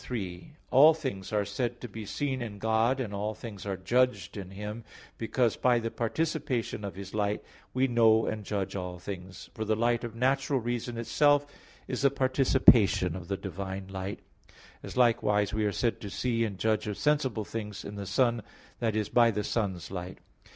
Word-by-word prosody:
3: 95 +1 -5 0.2
All 150 +5 +8
things 130 -12 -5
are 105 -1 +1
said 120 +1 -2
to 125 - -6
be 110 -1 -8
seen 135 0 -2
in 110 -4 -5
God 110 +5 +2
and 110 -6 -3
all 105 +2 -2
things 105 -3 -8
are 95 -1 -2
judged 105 -1 +1
in 95 -3 -6
Him, 105 +4 -6 0.4
because 115 0 +1
by 125 -1 +3
the 115 -1 -2
participation 130 -3 -1
of 100 - -5
His 100 0 -8
light, 105 -1 0 0.3
we 130 +1 +2
know 115 -2 +4
and 105 -1 -3
judge 100 -1 -3
all 90 -2 -4
things; 90 +1 -8
for 110 - -3
the 110 0 +1
light 120 +2 +1
of 115 -1 -5
natural 135 +2 +1
reason 120 0 -3
itself 145 +5 +3 0.4
is 130 +1 -3
a 140 - +6
participation 125 - +4
of 90 -2 -7
the 100 - -2
divine 95 0 -5
light; 95 +1 -5 0.6
as - - -8
likewise 105 -4 +3
we 110 0 +1
are 105 - +1
said 115 +5 -1
to 100 - -5
see 115 +2 0
and 100 -3 -5
judge 110 +1 0
of 105 - -3
sensible 135 -7 +1
things 105 -2 -6
in 100 - -6
the 100 -1 -6
sun, 120 +3 +2 0.4
i.e., 110 -2 +1
by 120 -1 +6
the 105 -1 -1
sun's 95 -6 -2
light. 90 -1 -5
110 Hz, 185 wpm, -29 LUFS, 100-125 Hz, 0.6 s, All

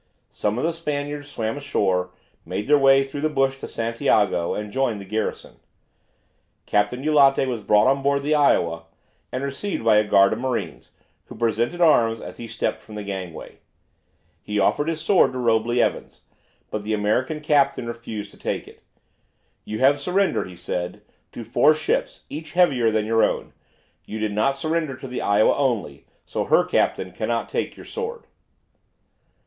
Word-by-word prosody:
Some 105 +2 -2
of 125 - -2
the 165 +1 +1
Spaniards 145 -2 -4
swam 110 -3 -3
ashore, 95 -10 0 0.3
made 105 - -4
their 150 - +6
way 135 0 +5
through 135 +1 -6
the 155 - +1
bush 135 -2 0
to - - -6
Santiago, 110 -6 0
and 105 0 -5
joined 120 -3 0
the 100 - -9
garrison. 110 +2 -4 1.1
Captain 105 +5 0
Eulate 140 -3 +4
was 120 -4 -3
brought 105 0 +4
on 135 +1 +3
board 140 0 +1
the 150 +2 +1
"Iowa," 85 - +2 0.5
and 130 - -3
received 140 - -3
by 110 -2 +5
a 105 - +5
guard 100 -1 +4
of 110 - -4
marines, 120 - -3 0.4
who - - -11
presented 120 +9 -1
arms 115 -9 +4
as - - -9
he 120 - -7
stepped 110 0 -3
from 110 - -12
the 105 - -5
gangway. 95 -4 -7 0.8
He 105 - -4
offered 145 +9 +2
his 165 -1 -1
sword 165 -3 +3
to - - -4
Robley 120 0 +1
Evans, - - -3 0.5
but 105 - -3
the 110 +1 -1
American 115 +9 0
captain 145 -4 +2
refused 115 -3 -6
to - - -17
take - - -4
it. - - -16 0.8
"You 110 - -4
have 140 +2 +4
surrendered," 190 - +1
he 90 - -11
said, 90 0 -5 0.3
"to 120 - -7
four 145 +7 +4
ships, 155 - -2
each 155 +2 -8
heavier 140 -10 +3
than 110 -1 0
your 115 +1 +3
own. - - -1 0.5
You 110 - -6
did 110 -1 -2
not 135 +7 +1
surrender 155 -1 -1
to 135 - -8
the 125 - -4
'Iowa' 100 +1 +3
only, 115 - -2 0.2
so - - -3
her - - +4
captain 95 - 0
cannot 115 +3 -2
take - - -3
your - - -11
sword." 465 0 -5
120 Hz, 175 wpm, -23 LUFS, 105-145 Hz, 1.1 s, their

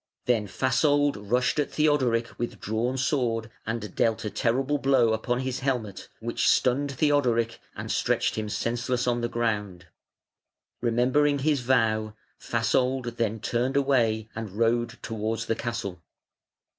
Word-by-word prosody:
Then 115 -4 +1
Fasold 145 - +2
rushed 125 +5 +2
at 145 - 0
Theodoric 130 -7 +1
with 120 - -4
drawn 115 +5 -1
sword, 115 -5 0 0.2
and 110 -3 -3
dealt 115 -1 +1
a 105 - -2
terrible 135 +5 0
blow 130 -5 +3
upon 120 +3 -1
his 130 -1 -3
helmet, 125 -8 -3
which 115 +1 0
stunned 140 +3 +2
Theodoric 125 -5 +1 0.2
and - - -5
stretched - - +1
him 110 -1 -3
senseless 120 +3 -1
on 120 -1 +1
the 120 - -1
ground. 105 -7 -2 1.0
Remembering 130 +5 +2
his 140 -1 +1
vow, 110 -4 +1 0.2
Fasold 120 +1 0
then 115 -1 -1
turned 125 +4 0
away 115 -6 +2
and 110 -4 -6
rode 115 +2 +1
towards 110 +1 -2
the 115 - 0
castle. 110 -8 -4
120 Hz, 135 wpm, -26 LUFS, 115-130 Hz, 1.0 s, blow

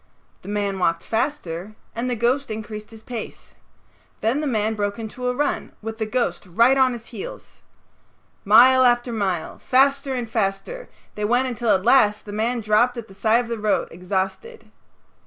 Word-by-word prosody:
The - - -14
man 200 -2 -1
walked 170 -2 +1
faster 215 - -3 0.2
and 240 +2 -2
the 245 - 0
ghost 245 +4 0
increased 215 -1 -6
his 220 -1 -14
pace. 235 -2 -8 0.7
Then 240 +7 +1
the 300 - -1
man 220 -3 0
broke 205 -1 -2
into 230 +3 -5
a 250 - 0
run 290 +3 -1
with 225 0 -6
the 220 - -1
ghost 235 -6 -1
right 230 +9 +4
on 260 -2 +3
his 235 -1 -8
heels. 205 - -9 0.8
Mile 250 +5 +7
after 240 -1 +2
mile, 190 -6 -2
faster 275 +1 +2
and 245 -2 -3
faster, 220 - -3 0.2
they 210 - -5
went 245 +4 +2
until 240 -1 -2
at 190 -2 +3
last 210 -5 +4
the 205 - -8
man 230 +3 -1
dropped 220 +4 +2
at 230 - -6
the - - -13
side 225 +4 +2
of - - -10
the 230 -1 -4
road 210 0 0
exhausted. 190 - -4
225 Hz, 175 wpm, -22 LUFS, 210-250 Hz, 0.8 s, Mile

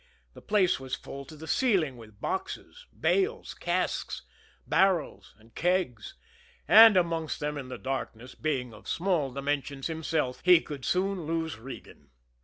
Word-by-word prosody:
The - - -13
place 200 -7 +2
was 130 -1 -4
full 140 +2 -9
to 155 - -12
the 155 +1 -10
ceiling 185 - +2
with 110 -4 -14
boxes, 485 - -5
bales, 430 +5 +1
casks, - - -2 0.4
barrels 190 -4 +1
and 115 +1 -22
kegs, 175 - -1 0.5
and 220 -2 +9
amongst 165 -3 0
them 150 0 -2
in 135 -3 -6
the 125 - -6
darkness, 130 -2 -5
being 130 -6 -2
of 105 - -14
small 165 -7 0
dimensions 140 0 -3
himself, 160 -5 -2
he 180 -2 +7
could 145 -5 -8
soon 185 -3 0
lose 160 -6 -2
Regan. 110 - -11
155 Hz, 145 wpm, -28 LUFS, 130-180 Hz, 0.5 s, and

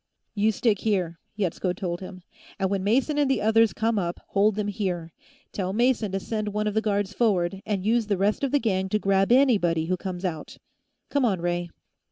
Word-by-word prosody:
"You 215 +1 +2
stick 215 -1 +1
here," 180 -6 -1 0.2
Yetsko 185 -2 -1
told 175 -3 -4
him, 185 -1 -9 0.3
"and 190 -1 -1
when 195 -1 -1
Mason 270 +8 +1
and 285 -2 +2
the 265 -5 +2
others 220 +1 +4
come 225 -1 0
up, 175 -2 -3
hold 205 +1 +2
them 210 -1 -2
here. 180 -5 -3 0.4
Tell 190 -1 -3
Mason 235 -2 +1
to 195 - 0
send 215 +1 -3
one 210 +1 -1
of 210 - -1
the 220 - +1
guards 205 -2 -1
forward, 195 -5 +1
and 200 -3 -1
use 225 0 +2
the 200 -2 +1
rest 205 +7 0
of 275 - +2
the 290 - +4
gang 190 -7 0
to 215 - +2
grab 195 0 +2
anybody 200 -12 +3
who 185 +2 -1
comes 185 0 -5
out. 160 -4 -5 0.5
Come 285 -2 +1
on, 200 -7 +1
Ray." 175 0 -2
200 Hz, 210 wpm, -25 LUFS, 185-220 Hz, 0.5 s, others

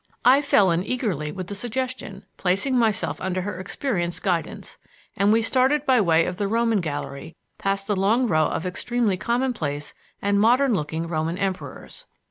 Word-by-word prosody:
I 260 +3 +7
fell 205 -10 +4
in 170 +2 +1
eagerly 195 - -2
with 185 +1 -6
the 205 - -7
suggestion, 240 -3 -4
placing 195 +9 0
myself 205 -11 +1
under 185 0 -1
her 195 -1 -5
experienced 185 -3 -2
guidance, 175 -4 -3 0.4
and 200 +1 +3
we 225 +1 +3
started 265 +5 +2
by 255 -4 +4
way 165 -3 +3
of 180 - -4
the 200 -1 -1
Roman 225 -1 +1
Gallery, 145 -1 -5 0.2
past 195 0 -1
the 205 - 0
long 215 +7 +2
row 155 -8 +2
of 165 - -3
extremely 215 +3 0
commonplace 210 - -2 0.3
and 200 0 +1
modern 245 +4 +4
looking 160 -1 -2
Roman 165 +1 -2
Emperors. 195 - -5
200 Hz, 165 wpm, -24 LUFS, 175-240 Hz, 0.4 s, I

